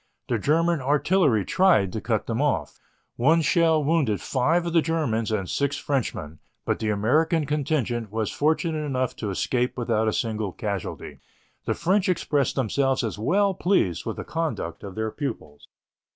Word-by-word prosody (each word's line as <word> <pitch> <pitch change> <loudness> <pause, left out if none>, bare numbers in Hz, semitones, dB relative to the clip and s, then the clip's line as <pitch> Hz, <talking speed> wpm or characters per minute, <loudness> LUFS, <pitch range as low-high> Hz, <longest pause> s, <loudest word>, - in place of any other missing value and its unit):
The 120 - +1
German 165 +5 +2
artillery 145 - +2
tried 170 - +3
to 110 - -3
cut 110 -1 -1
them 115 +3 -2
off. 145 -3 -1 0.4
One 160 +7 +4
shell 160 -1 +3
wounded 140 - +1
five 160 - +1
of 170 - -3
the 165 - +5
Germans 135 -10 -1
and 100 -4 -1
six 140 +6 -1
Frenchmen, 90 - -3 0.3
but - - 0
the 110 - -1
American 150 - +2
contingent 135 -7 -1
was 110 -1 -2
fortunate 155 +1 0
enough 130 -3 -1
to 105 - -3
escape 125 +6 -1
without 115 -2 0
a 110 - +1
single 110 -4 -2
casualty. 100 -3 -5 0.5
The - - 0
French 190 +3 +1
expressed 150 -6 0
themselves 135 +1 +1
as 110 -2 -3
well 195 - +2
pleased 170 - +1
with 115 - -2
the - - -4
conduct 160 - -3
of 100 -2 -8
their 110 0 -2
pupils. 115 - -6
135 Hz, 165 wpm, -25 LUFS, 110-160 Hz, 0.5 s, the